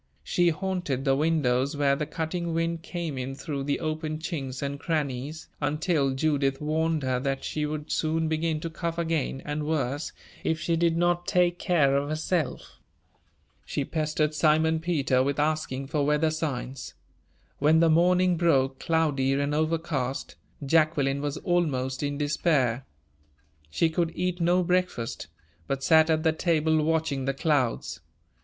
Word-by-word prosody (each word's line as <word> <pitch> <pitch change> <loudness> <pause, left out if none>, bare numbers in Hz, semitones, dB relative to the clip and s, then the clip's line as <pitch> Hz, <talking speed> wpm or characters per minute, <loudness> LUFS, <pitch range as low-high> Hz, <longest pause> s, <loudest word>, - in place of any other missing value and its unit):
She 175 - +2
haunted 175 -6 -2
the 135 -1 +3
windows 145 -2 +1
where 140 -1 +3
the 150 +1 -3
cutting 165 +2 -3
wind 165 0 -1
came 165 -5 -4
in 130 +1 -4
through 140 -1 -4
the 140 0 0
open 155 -1 -3
chinks 140 -5 -4
and 140 0 -3
crannies, 150 -2 -3
until 145 -2 +1
Judith 140 -2 +1
warned 155 0 0
her 130 -1 0
that 135 +1 -2
she 150 -1 -2
would 150 0 -5
soon 160 0 0
begin 160 0 0
to 165 - -3
cough 170 0 -3
again, 160 -5 -1
and 150 0 -3
worse, 145 -2 -1 0.3
if 160 -1 0
she 170 +1 0
did 165 0 +2
not 175 0 +1
take 175 -1 +2
care 150 -6 +3
of 140 +1 0
herself. 155 -1 -2 0.8
She 140 - -3
pestered 155 0 -1
Simon 160 +1 +3
Peter 150 -6 +1
with 140 +1 0
asking 150 -3 -1
for 145 +1 -1
weather 150 +2 +2
signs. 135 -5 -4 0.6
When 155 +3 +4
the 165 - +5
morning 180 +2 +4
broke, 135 -6 +2
cloudy 150 -5 +1
and 140 +1 0
overcast, 155 -4 -1 0.3
Jacqueline 145 -2 +2
was 145 -1 -2
almost 140 -8 0
in 145 -1 -2
despair; 145 -4 +1 0.8
she 165 - +2
could 165 +1 0
eat 180 0 -2
no 175 +2 +3
breakfast, 180 -9 -1 0.4
but 135 0 -2
sat 160 +1 +5
at 155 -1 +2
the 160 -1 +3
table 160 -1 +2
watching 155 -4 0
the 135 0 -1
clouds. 140 -6 0
155 Hz, 150 wpm, -27 LUFS, 140-165 Hz, 0.8 s, the